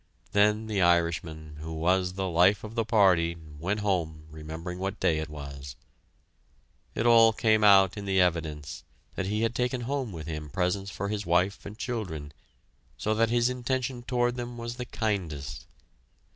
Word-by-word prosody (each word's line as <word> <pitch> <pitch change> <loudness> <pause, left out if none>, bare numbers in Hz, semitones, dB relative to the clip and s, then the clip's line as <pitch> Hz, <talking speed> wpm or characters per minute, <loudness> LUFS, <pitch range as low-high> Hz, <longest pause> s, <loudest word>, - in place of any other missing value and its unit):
Then 105 +2 +3
the 105 -3 -1
Irishman, 85 -3 +1
who 80 +1 -6
was 90 +3 +1
the 95 0 -2
life 90 +3 +4
of 110 0 -7
the 115 -1 0
party, 90 -7 +3 0.2
went 100 +6 -1
home, 85 -6 -1
remembering 80 +3 -7
what 95 +2 -3
day 80 -1 +2
it 80 0 -4
was. 70 -3 -8 1.2
It 115 - -1
all 115 -1 +7
came 110 -1 +2
out 95 -2 +6
in 100 - -5
the 95 -1 +2
evidence 80 -5 -1 0.3
that 95 - -3
he 105 +2 0
had 115 0 +1
taken 125 0 -1
home 130 -1 -2
with 80 -4 -7
him 75 -2 -5
presents 95 +5 -1
for 100 +2 -4
his 105 -2 -3
wife 90 +5 +1
and 105 +1 -9
children, 90 - -4 0.6
so 110 - 0
that 115 +1 +2
his 120 0 +3
intention 125 0 -2
toward 120 0 0
them 120 0 -5
was 115 +1 -5
the 125 - -4
kindest. 75 - -3
95 Hz, 170 wpm, -28 LUFS, 80-110 Hz, 1.2 s, all